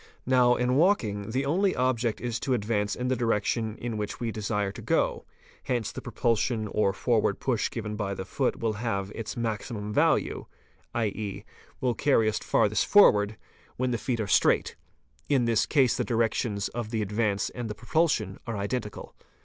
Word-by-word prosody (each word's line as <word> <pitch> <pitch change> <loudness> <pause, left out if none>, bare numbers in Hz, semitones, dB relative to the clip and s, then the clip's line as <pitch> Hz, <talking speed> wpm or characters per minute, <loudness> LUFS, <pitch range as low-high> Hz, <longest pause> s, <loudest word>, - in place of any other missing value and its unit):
Now 125 -1 +4
in 125 +1 +1
walking, 115 - +2
the 130 +4 -1
only 185 +7 +2
object 120 -3 0
is 120 -2 -2
to 130 - 0
advance 105 -2 -1
in 125 - -3
the 130 - +2
direction 115 -1 0
in 115 -2 -4
which 105 -1 -4
we 115 -2 -2
desire 105 -2 -2
to - - -10
go; - - 0 0.4
hence 120 -3 -1
the - - -7
propulsion 115 -1 0
or 105 -2 +2
forward 110 0 +1
push 120 -5 0
given 105 -2 -5
by 100 -2 -3
the 95 - -5
foot - - -1
will 115 -1 -1
have 100 -4 -2
its 115 -2 -5
maztimum 110 -2 -3
value, - - +1 0.5
7.e., 105 -3 -3 0.4
will 125 -2 +1
carry 115 -4 +2
us 110 - 0
farthest 110 -1 +1
forward, 105 - +5 0.4
when 130 0 0
the 120 - -1
feet 120 -3 -2
are 110 - 0
straight; 100 - +2 0.5
in 135 -4 +3
this 115 -2 +2
case 135 -5 +3
the - - 0
directions 115 -3 0
of 120 -2 -5
the 110 -2 -1
advance 105 0 -1
and 120 -3 -5
the 105 - -5
propulsion 120 - 0
are 115 -2 -3
identical. 105 +1 -4
115 Hz, 175 wpm, -27 LUFS, 105-125 Hz, 0.5 s, forward